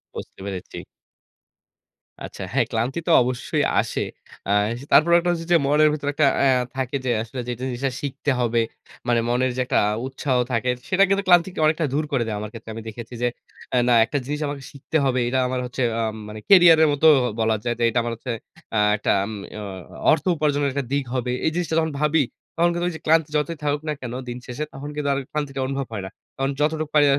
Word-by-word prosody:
বুঝতে - - -8
পেরেছি। 95 -3 -6 1.5
আচ্ছা - - -9
হ্যাঁ, 125 -2 +3
ক্লান্তি 120 +6 -1
তো - - +3
অবশ্যই 125 0 -1 0.2
আসে। - - -3 0.5
আ - - 0 0.4
তারপর 155 +4 +6
একটা 175 +1 -1
হচ্ছে 165 -1 -3
যে, 175 - +7
মনের 150 +2 +5
ভিতরে 145 -1 -2
একটা 155 +1 +3 0.2
এ - - +4 0.3
থাকে 130 0 -2
যে, 125 - +1
আসলে 115 +3 -8
যেটা 125 0 -4
জিনিসটা 130 +2 -2
শিখতে 140 0 -2
হবে। 120 -1 +2 0.5
মানে 120 -1 +3
মনের 125 +1 +1
যে, - - +1
একটা - - +2 0.3
উৎসাহ 135 0 -1
থাকে 125 +1 0 0.2
সেটা 190 +1 +4
কিন্তু 195 0 +2
ক্লান্তিকে 175 0 +4
অনেকটা 155 +1 +2
দূর 150 +2 +1
করে 130 -4 +1
দেয় 110 - -2
আমার 105 0 -5
ক্ষেত্রে - - -10
আমি 115 - -6
দেখেছি 115 +2 -9
যে, 120 - +3 0.5
এ - - +4
না 125 - +5
একটা 145 - -2
জিনিস 150 +2 -3
আমাকে 140 -1 -5
শিখতে 140 +2 -2
হবে। 130 -1 +1
এটা 130 +2 +1
আমার 130 0 -2
হচ্ছে 125 +1 -5 0.2
উম 110 -1 -1
মানে 105 0 -7
কেরিয়ারের 170 -5 +8
মতো 145 +3 +3 0.3
বলা 110 0 +2
যায়। 120 -1 -1
যে, - - +1
এটা 115 - +1
আমার 120 0 -2
হচ্ছে 120 +2 -6 0.4
আ - - +3 0.2
একটা 105 - 0
আম 105 - -4 0.3
আ - - -6 0.5
অর্থ 160 - +2
উপার্জনের 145 -2 +1
একটা 140 0 -1
দিক 140 0 +1
হবে, 125 -1 -1
এই 160 - +2
জিনিসটা 175 -2 -1
যখন 160 -1 0
ভাবি 150 0 +3 0.3
তখন 170 +1 +3
কিন্তু 175 0 -1
ওই - - -6
যে, 160 - -9
ক্লান্তি 160 -1 +3
যতই 160 +2 -2
থাকুক 145 0 0
না 150 - 0
কেন 120 -2 -5 0.2
দিন 120 - -5
শেষে 125 +4 -4
তখন 145 +2 -7
কিন্তু 145 -1 -1
আর - - -1
ক্লান্তিটা 140 -3 -3
অনুভব 135 -1 -3
হয় 100 -3 -4
না। - - -6 0.3
তখন 135 0 -1
যতটুকি 155 0 0
পারি 150 -1 +6
140 Hz, 210 wpm, -23 LUFS, 120-155 Hz, 1.5 s, কেরিয়ারের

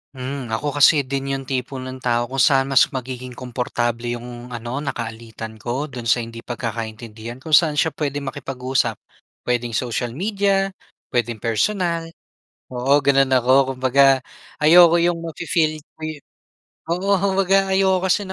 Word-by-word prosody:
Hmm. 130 -2 -5
Ako 145 +5 -2
kasi 145 -1 +5
din 135 0 -2
'yong 135 -1 -4
tipo 130 0 -3
ng 130 0 -6
tao, 120 -1 +1
kung 135 - -7
saan 135 0 +4
mas 135 - +5
magiging 130 -1 -6
komportable 120 -1 -3
'yong 120 +1 -7
ano, 120 +4 -4
nakaalitan 115 -3 -6
ko, 120 +7 -3
do'n 125 -3 -8
sa 120 +1 +2
hindi 115 0 -7
pagkakaintindihan, 115 -1 -6
kung 155 +2 +3
saan 150 -2 +4
siya 160 -4 +1
puwedeng 145 -2 -3
makipag-usap. 130 -1 -2 0.5
Puwedeng 120 -1 0
social 120 0 -2
media, 195 - +1 0.4
puwedeng 120 -3 -1
personal. 165 - -1 0.6
Oo, 135 +3 +2
gano'n 135 -1 +3
ako. 130 +2 +4
Kumbaga, 130 +1 +4 0.4
ayoko 170 +2 +7
'yong 175 0 +2
mafi-feel 160 -1 -1 0.2
ko - - -36
yu 155 -3 -6 0.7
oo, 185 +4 0
kumbaga 195 0 +2
ayoko 190 -1 +2
kasi 205 +3 +2
na 190 - -6
130 Hz, 145 wpm, -21 LUFS, 120-155 Hz, 0.7 s, ayoko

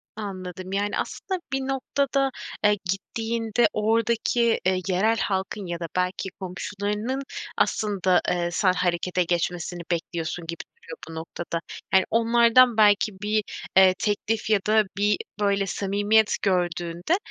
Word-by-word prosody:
Anladım. 185 -3 -6
Yani, 205 +1 0
aslında 375 -1 -3
bir 270 - +1
noktada, 270 +1 0 0.3
eee, 210 0 +4
gittiğinde 225 +3 0
oradaki, 230 +2 +1
eee, 185 0 +2
yerel 205 +5 +2
halkın 195 0 -2
ya 170 -1 -4
da 170 - -4
belki 185 +1 -1
komşularının 205 +6 -3 0.4
aslında, 190 -4 +2
eee, 175 -1 0
sen 185 +1 +2
harekete 180 0 0
geçmesini 175 0 -2
bekliyorsun 170 0 -3
gibi 170 0 -4 0.2
duruyor 470 +1 -10
bu 165 - -8
noktada. 165 +1 -5 0.3
Yani, 190 0 +6
onlardan 235 +1 +5
belki 210 0 +4
bir, 210 +1 +1 0.3
eee, 190 -1 +8
teklif 215 +1 -1
ya 215 -2 +4
da 215 0 +5
bir, 205 0 +2 0.2
böyle, 200 -1 +2
samimiyet 205 +3 +2
gördüğünde, 175 - 0
205 Hz, 130 wpm, -25 LUFS, 180-225 Hz, 0.4 s, eee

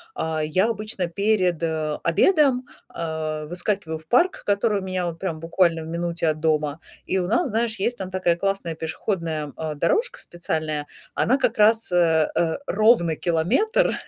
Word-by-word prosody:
А, 160 -1 -2
я 185 +8 +2
обычно 215 -4 -3
перед, 185 -2 +1
э, 155 -2 -2
обедом, 265 - +3 0.2
а, 155 -2 -4
выскакиваю 175 -1 -2
в 160 - -20
парк, 355 +9 +2
который 205 0 +1
у - - -8
меня 185 -1 -2
вот 165 -1 -5
прям 165 -4 -3
буквально 165 0 +1
в 160 - -8
минуте 170 0 -2
от 155 0 0
дома. 150 -1 0 0.3
И 190 - 0
у 180 - -1
нас, 260 - +1
знаешь, 225 0 -1
есть 235 +5 -1
там 190 -1 -4
такая 185 -2 +1
классная 195 -2 -2
пешеходная, 160 0 -3
м, 145 - -11
э, 155 -1 -4
дорожка 455 - 0
специальная, 155 -3 -3 0.3
она 260 +3 +2
как 250 -5 0
раз, 220 0 +4
э, 165 -3 +3
э, 165 -1 +1
ровно 215 -8 +3
километр, 180 - +1
175 Hz, 170 wpm, -23 LUFS, 160-210 Hz, 0.3 s, раз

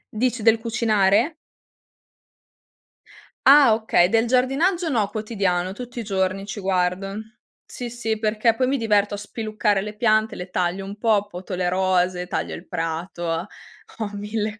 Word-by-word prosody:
Dici 245 -1 0
del 225 0 +5
cucinare? 225 - +2 2.1
Ah 275 -4 +8
okay, 220 -5 +3
del 225 +3 +2
giardinaggio, 275 +9 +1
no, 220 -8 +1
quotidiano, 195 -4 -1
tutti 245 +2 -8
i - - -3
giorni 195 -1 -1
ci 205 0 -6
guardo. 190 +1 -1 0.5
Sì 245 -1 -7
sì, 225 -2 -3
perché 220 +1 +1
poi 255 +1 +1
mi 275 +1 +1
diverto 210 -3 +1
a - - -6
spiluccare 210 -1 -1
le 210 +1 -7
piante, 215 -1 +2
le 180 +1 -7
taglio 180 +2 -1
un 200 +1 -8
po', 210 -2 +2
poto 185 0 -8
le 180 0 -1
rose, 180 -1 +1
taglio - - -3
il 175 - -11
prato. 165 +2 -4 0.7
Ho 215 -2 -3
mille 210 +1 -3
210 Hz, 150 wpm, -23 LUFS, 190-230 Hz, 2.1 s, Ah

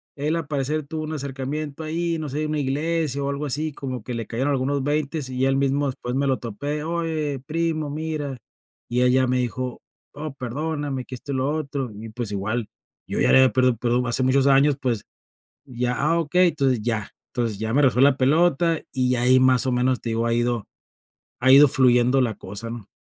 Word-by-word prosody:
él 150 +3 -1
al 165 -3 -3
parecer 145 +1 -2
tuvo 155 +1 -4
un 155 +1 -5
acercamiento 140 +2 -5
ahí, 165 +2 -2
no 155 -2 -5
sé, 150 +3 -2
una 155 0 -2
iglesia 145 +1 -1
o 140 - -1
algo 140 +1 -3
así, 150 +2 -2
como 130 -4 -6
que 125 - -5
le 115 -1 -4
cayeron 130 +5 -1
algunos 140 +1 0
veintes 145 -1 -2
y 130 0 -1
él 135 0 +2
mismo 140 +1 +1
después 125 -1 -4
me 140 +1 +1
lo 130 -1 +1
topé: 145 +6 -4
"Oye 160 -4 -2
primo, 160 -1 -1
mira", 150 -2 -4 0.5
y 125 +1 +1
él 125 0 +4
ya 130 0 +3
me 125 +1 +1
dijo: 125 +1 -3 0.3
"Oh 150 0 -6
perdóname 140 +1 -4
que 130 - -7
esto 140 +3 -8
y - - -2
lo 130 +1 0
otro", 140 -5 -4
y 110 +2 -9
pues 110 -1 -4
igual 105 +3 -2 0.4
yo - - -2
ya - - +4
le - - +7
había 130 -1 +6
pedido 130 -1 +3
perdón 120 +2 0
hace 120 +2 +1
muchos 135 +1 +3
años 140 +1 +4
pues 120 -6 -2 0.6
ya, 125 -1 -1
"Ah, 165 +4 +2
okey", 180 +3 +3
entonces, 135 -7 0
ya 110 -2 -1 0.2
entonces 115 -5 -2
ya 110 +1 -2
me 145 +4 +3
regresó 125 -3 +3
la 140 0 +5
pelota 160 +4 +2
y 130 -2 0
ya 125 -1 +3
ahí 130 +1 +7
más 130 -1 +4
o 130 - +1
menos, 125 +1 +1
te 115 - -4
digo 115 +1 0
ha 115 - +1
ido 120 -2 0 0.7
ha 130 +1 +4
ido 140 +2 +9
fluyendo 125 0 +4
la 120 -4 0
cosa, 105 +4 -5
¿no? 115 -4 -8
135 Hz, 215 wpm, -23 LUFS, 125-150 Hz, 0.7 s, ido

